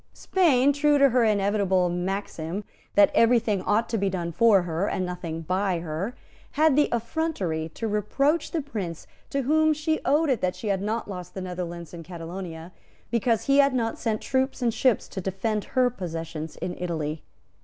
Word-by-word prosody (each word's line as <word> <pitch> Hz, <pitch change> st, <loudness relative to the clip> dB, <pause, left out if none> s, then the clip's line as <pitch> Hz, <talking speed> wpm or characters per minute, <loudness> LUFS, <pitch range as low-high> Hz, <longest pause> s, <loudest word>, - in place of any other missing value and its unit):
Spain, 285 Hz, -7 st, +3 dB
true 295 Hz, +1 st, +3 dB
to 275 Hz, -1 st, +6 dB
her 245 Hz, -1 st, +3 dB
invariable 200 Hz, -3 st, +2 dB
maxim 180 Hz, 0 st, -3 dB, 0.3 s
that 200 Hz, 0 st, +6 dB
every 230 Hz, +1 st, +5 dB
thing 215 Hz, -4 st, 0 dB
ought 215 Hz, +4 st, +1 dB
to 225 Hz, -, -1 dB
be 195 Hz, 0 st, +1 dB
done 175 Hz, -2 st, -3 dB
for 210 Hz, -1 st, +4 dB
her 175 Hz, +3 st, -1 dB
and 185 Hz, -, -1 dB
nothing 170 Hz, -2 st, -5 dB
by 185 Hz, +2 st, 0 dB
her, 170 Hz, +9 st, -4 dB, 0.4 s
had 310 Hz, -1 st, +4 dB
the 295 Hz, 0 st, +3 dB
effrontery 230 Hz, -, -2 dB
to 225 Hz, -, -3 dB
reproach 275 Hz, -, +1 dB
the 325 Hz, -3 st, -2 dB
Prince 195 Hz, -, -5 dB, 0.2 s
to 275 Hz, -1 st, -1 dB
whom 315 Hz, +3 st, +3 dB
she 315 Hz, +1 st, -1 dB
owed 295 Hz, +1 st, +3 dB
it 245 Hz, -, 0 dB
that 185 Hz, 0 st, 0 dB
she 215 Hz, -, -4 dB
had 195 Hz, -1 st, 0 dB
not 220 Hz, +3 st, -2 dB
lost 180 Hz, -3 st, -7 dB
the 190 Hz, -, -4 dB
Netherlands 175 Hz, -2 st, -6 dB
and 170 Hz, -1 st, -8 dB
Catalonia, 170 Hz, 0 st, -7 dB, 0.4 s
because 230 Hz, -1 st, +1 dB
he 275 Hz, +1 st, +4 dB
had 280 Hz, -2 st, +4 dB
not 225 Hz, -2 st, -1 dB
sent 220 Hz, -3 st, -1 dB
troops 265 Hz, +1 st, 0 dB
and 235 Hz, -2 st, +2 dB
ships 250 Hz, 0 st, +2 dB
to 190 Hz, -, -6 dB
defend 195 Hz, +3 st, -2 dB
her 255 Hz, -1 st, +2 dB
possessions 165 Hz, -6 st, -6 dB
in 180 Hz, -, -4 dB
Italy. 160 Hz, -3 st, -3 dB
205 Hz, 185 wpm, -26 LUFS, 180-250 Hz, 0.4 s, to